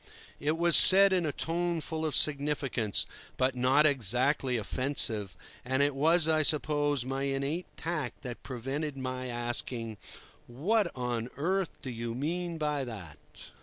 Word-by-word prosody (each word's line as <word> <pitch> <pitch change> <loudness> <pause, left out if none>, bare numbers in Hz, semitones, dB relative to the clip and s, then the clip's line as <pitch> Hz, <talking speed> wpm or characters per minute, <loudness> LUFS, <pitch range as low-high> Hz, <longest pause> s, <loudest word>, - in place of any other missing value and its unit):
It 155 +2 0
was 170 0 +4
said 195 +1 +8
in 180 -3 +1
a - - -1
tone 170 +2 -1
full 160 0 -3
of 150 - -3
significance, 140 -7 0 0.3
but 130 +1 +1
not 130 +4 +3
exactly 130 0 +3
offensive, 110 -5 -1 0.3
and 130 +2 +1
it 145 0 +1
was, 160 +4 +3
I 155 -1 +3
suppose, 145 -3 +1
my 135 +1 -3
innate 140 +5 -2
tact 155 -6 -4
that 125 -3 -7
prevented 135 +4 -4
my 130 -1 -4
asking, 120 -2 -3 0.5
"What 175 - 0
on 120 -2 -3
earth 185 +4 -2
do 130 - -5
you 115 0 -5
mean 170 +5 -3
by 150 -3 -1
that?" 80 - -9
140 Hz, 145 wpm, -29 LUFS, 125-155 Hz, 0.5 s, said